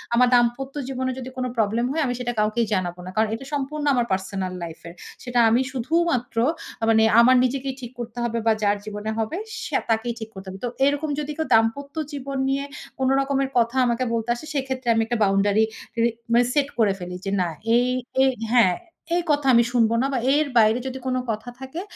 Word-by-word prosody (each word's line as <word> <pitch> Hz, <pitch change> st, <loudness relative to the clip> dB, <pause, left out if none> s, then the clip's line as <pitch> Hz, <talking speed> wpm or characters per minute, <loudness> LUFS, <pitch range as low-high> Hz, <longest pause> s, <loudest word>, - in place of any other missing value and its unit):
আমার 250 Hz, +1 st, +5 dB
দাম্পত্য 245 Hz, +3 st, +1 dB
জীবনে 260 Hz, -1 st, -2 dB
যদি 255 Hz, 0 st, -6 dB
কোনো 255 Hz, 0 st, -1 dB
প্রবলেম 225 Hz, +2 st, +1 dB
হয়, 320 Hz, +3 st, 0 dB
আমি 245 Hz, -, -1 dB
সেটা 245 Hz, -1 st, -2 dB
কাউকেই 215 Hz, +2 st, +1 dB
জানাবো 180 Hz, -2 st, -2 dB
না। -, -, -6 dB
কারণ 220 Hz, 0 st, +3 dB
এটা 270 Hz, -, -9 dB
সম্পূর্ণ 290 Hz, +1 st, -2 dB
আমার 245 Hz, -2 st, +2 dB
পার্সোনাল 190 Hz, -1 st, -2 dB
লাইফ 165 Hz, -1 st, -7 dB
এর। 170 Hz, -, -9 dB, 0.3 s
সেটা 245 Hz, -1 st, 0 dB
আমি 235 Hz, +3 st, +3 dB
শুধুমাত্র, 260 Hz, -1 st, 0 dB, 0.4 s
আ -, -, -4 dB
মানে 220 Hz, 0 st, +5 dB, 0.2 s
আমার 255 Hz, +2 st, +6 dB
নিজেকেই 265 Hz, +1 st, -1 dB
ঠিক 240 Hz, -1 st, -7 dB
করতে 240 Hz, 0 st, -7 dB
হবে 235 Hz, -1 st, -1 dB
বা 225 Hz, -, +6 dB
যার 205 Hz, 0 st, +3 dB
জীবনে 210 Hz, 0 st, -4 dB
হবে 225 Hz, +10 st, -2 dB, 0.3 s
সে -, -, -8 dB, 0.2 s
তাকেই 225 Hz, +1 st, 0 dB
ঠিক 220 Hz, -1 st, -7 dB
করতে 190 Hz, 0 st, -10 dB
হবে। 190 Hz, +1 st, -8 dB
তো -, -, -1 dB, 0.2 s
এরকম 290 Hz, +2 st, 0 dB
যদি 300 Hz, 0 st, -3 dB
কেউ 320 Hz, -, -1 dB
দাম্পত্য 275 Hz, +6 st, +1 dB, 0.2 s
জীবন 275 Hz, -1 st, -4 dB
নিয়ে 275 Hz, +1 st, 0 dB, 0.4 s
কোন 260 Hz, -, +1 dB
রকমের 275 Hz, 0 st, 0 dB
কথা 235 Hz, +1 st, +2 dB
আমাকে 240 Hz, +1 st, 0 dB
বলতে 230 Hz, 0 st, -2 dB
আসে, 240 Hz, -, -9 dB
সেক্ষেত্রে 265 Hz, -2 st, -3 dB
আমি 225 Hz, -, +2 dB
একটা 240 Hz, +1 st, -1 dB
বাউন্ডারি 200 Hz, +2 st, +3 dB, 0.3 s
ক্রি 230 Hz, 0 st, +2 dB, 0.3 s
মানে 240 Hz, +1 st, +5 dB
সেট 285 Hz, -2 st, +2 dB
করে 210 Hz, -3 st, +4 dB
ফেলি, 180 Hz, 0 st, -6 dB
যে 195 Hz, -, -2 dB
না, 180 Hz, -, +1 dB, 0.3 s
এই 245 Hz, +1 st, +3 dB, 0.4 s
এ -, -, +5 dB, 0.3 s
হ্যাঁ, 230 Hz, -7 st, +5 dB, 0.4 s
"এই 350 Hz, -, +2 dB
কথা 290 Hz, -1 st, +1 dB
আমি 235 Hz, 0 st, +6 dB
শুনব 230 Hz, -3 st, +3 dB
না 270 Hz, -, +1 dB
বা 260 Hz, -, +1 dB
এর 300 Hz, +1 st, +2 dB
বাইরে 220 Hz, +1 st, +5 dB
যদি 265 Hz, 0 st, -5 dB
কোনো 255 Hz, 0 st, 0 dB
কথা 220 Hz, +2 st, -5 dB
থাকে, 265 Hz, +6 st, -6 dB
240 Hz, 210 wpm, -23 LUFS, 220-270 Hz, 0.4 s, আমার